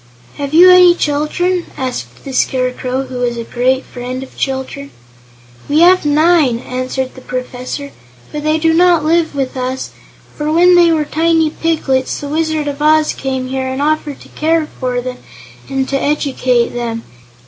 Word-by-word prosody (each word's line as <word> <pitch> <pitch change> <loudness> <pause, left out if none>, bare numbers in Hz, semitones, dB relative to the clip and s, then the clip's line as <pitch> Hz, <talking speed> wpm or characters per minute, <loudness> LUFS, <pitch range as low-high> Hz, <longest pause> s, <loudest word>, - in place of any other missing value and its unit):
"Have 280 -1 -4
you 355 +4 +8
any 360 -1 +7
children?" 340 +4 -1
asked 125 - -5
the 270 - -6
Scarecrow, 255 0 -1
who 255 -1 -7
was 240 -1 -1
a 230 - -4
great 255 +3 0
friend 250 +1 -6
of 265 - -13
children. 270 +1 -4 0.8
"We 300 +3 +3
have 365 -1 +5
nine," 300 -4 +3
answered 255 +1 -4
the 260 - -13
Professor; 255 +3 -5 0.4
"but 300 - -4
they 310 +1 +2
do 325 0 +2
not 345 -2 +4
live 325 -1 +1
with 270 -2 -2
us, 255 0 -4 0.4
for 300 0 -2
when 355 +3 +5
they 345 -1 +5
were 310 -2 +1
tiny 325 0 +1
piglets 295 -6 -1
the 285 - -6
Wizard 315 -1 -1
of 285 0 -4
Oz 310 0 +3
came 260 -1 -4
here 265 0 -2
and 260 +1 -3
offered 300 -1 -1
to - - -15
care 320 0 0
for 250 -1 -1
them 250 0 -6 0.5
and 270 -1 -1
to 275 0 -1
educate 260 -5 +1
them. 230 -1 -4
280 Hz, 170 wpm, -15 LUFS, 255-315 Hz, 0.8 s, you